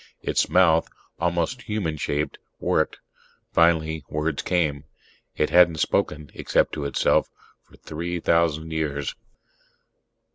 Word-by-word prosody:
Its - - +1
mouth, 85 -3 +4 0.3
almost 85 +9 -1
human 105 -9 -2
shaped, 75 0 -2 0.2
worked; - - 0 0.6
finally 80 -2 +3
words 75 0 -1
came. 75 -5 0 0.5
It 75 - +1
hadn't 85 -2 +6
spoken, 75 -1 0
except - - +1
to 70 - -3
itself, 70 - +2 0.3
for - - -21
three 85 +3 -4
thousand 80 -1 +1
years. 75 -3 -2
80 Hz, 110 wpm, -24 LUFS, 75-85 Hz, 0.6 s, hadn't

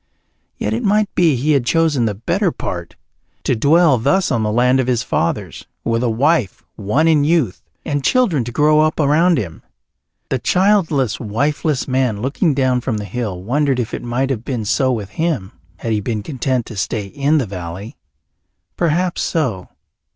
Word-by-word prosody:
Yet 105 - -2
it 115 - -1
might 210 0 +1
be 165 -5 +3
he 140 +5 0
had 140 -4 +3
chosen 155 -3 +2
the 105 -2 -1
better 170 - 0
part, 85 - -6 0.5
to - - +1
dwell 145 +2 +4
thus 190 +11 +1
on 115 -4 +1
the 105 -1 0
land 125 +3 +3
of 130 - 0
his 120 -3 +1
fathers, 85 - -2 0.2
with 115 0 0
a 125 - +1
wife 120 - +1
won 130 +11 +1
in 155 -3 +4
youth, 150 - +1 0.2
and 145 -2 -2
children 195 - +2
to 120 - -5
grow 150 +4 +3
up 155 +1 +1
around 160 +4 +3
him. 90 -9 -5 0.7
The 130 - 0
childless, 180 - +2
wifeless 140 +6 -1
man 130 -5 0
looking 140 - 0
down 130 -2 +1
from 120 -3 -2
the 105 - -5
hill 100 -3 -4
wondered 135 +3 +1
if 115 - -3
it - - -3
might 125 +3 -1
have 115 -4 -3
been 120 -5 -3
so 130 +5 +1
with 105 -5 -3
him 150 - -2 0.3
had 115 - -4
he 105 -1 0
been 105 0 -3
content 130 -2 -2
to 110 - -9
stay 105 +2 -2
in 140 +9 0
the 135 - +1
valley. 95 - -7 0.8
Perhaps 175 +2 0
so. 125 - -2
130 Hz, 180 wpm, -18 LUFS, 110-155 Hz, 0.8 s, dwell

